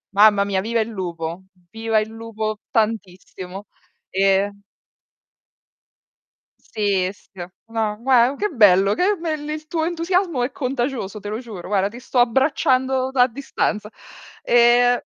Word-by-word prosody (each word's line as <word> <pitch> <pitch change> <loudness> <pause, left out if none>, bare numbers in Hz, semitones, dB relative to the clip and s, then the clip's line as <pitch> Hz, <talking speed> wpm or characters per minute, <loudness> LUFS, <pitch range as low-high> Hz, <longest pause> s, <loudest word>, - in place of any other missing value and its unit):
Mamma 205 -1 +6
mia, 195 -2 0
viva 230 +3 -1
il 220 - 0
lupo, 175 -3 -5 0.3
viva 225 -1 0
il 215 +1 -3
lupo 220 -1 -5
tantissimo. 195 -3 -3 0.4
Ehm 195 +1 +1 2.0
Sì, 200 -4 -1
sì. - - -26 0.4
No, 220 -2 -2
gua 255 +1 +4
che 420 - -1
bello, 200 - +5
che 395 - +2
bel 310 -4 -4
il 310 0 -5
tuo 325 -2 -1
entusiasmo 345 -4 0
è 250 - -2
contagioso, 250 -6 -3
te 205 +1 -7
lo 215 - -3
giuro. 220 -8 -9
Guarda, 195 -1 +1
ti 235 +3 -11
sto 250 0 -5
abbracciando 260 +1 +2
da 265 -2 +2
a - - +3
distanza. 225 -4 -3 0.5
Ehm 240 +1 +4
225 Hz, 135 wpm, -21 LUFS, 205-260 Hz, 2.0 s, Mamma